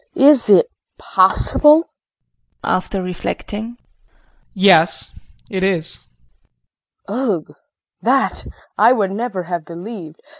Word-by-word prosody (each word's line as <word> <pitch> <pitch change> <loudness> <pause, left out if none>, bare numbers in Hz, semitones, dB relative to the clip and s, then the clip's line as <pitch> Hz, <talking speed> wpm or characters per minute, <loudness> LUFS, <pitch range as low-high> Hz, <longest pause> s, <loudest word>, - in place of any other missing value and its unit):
Is 275 -5 +5
it 210 - +6 0.3
possible? 300 +2 +4
JEAN - - -33 0.8
[After 185 +1 -2
reflecting]. 210 +5 -6 0.8
Yes, 175 -4 +3 0.4
it 190 -2 -4
is. 180 -4 -2 1.1
KRISTIN. 205 -6 -2
Ugh! - - -21 0.5
That - - 0 0.3
I 245 - +6
would 200 -6 -1
never 205 -3 -4
have 175 -1 -5
believed. 170 -1 -10
195 Hz, 100 wpm, -18 LUFS, 175-235 Hz, 1.1 s, it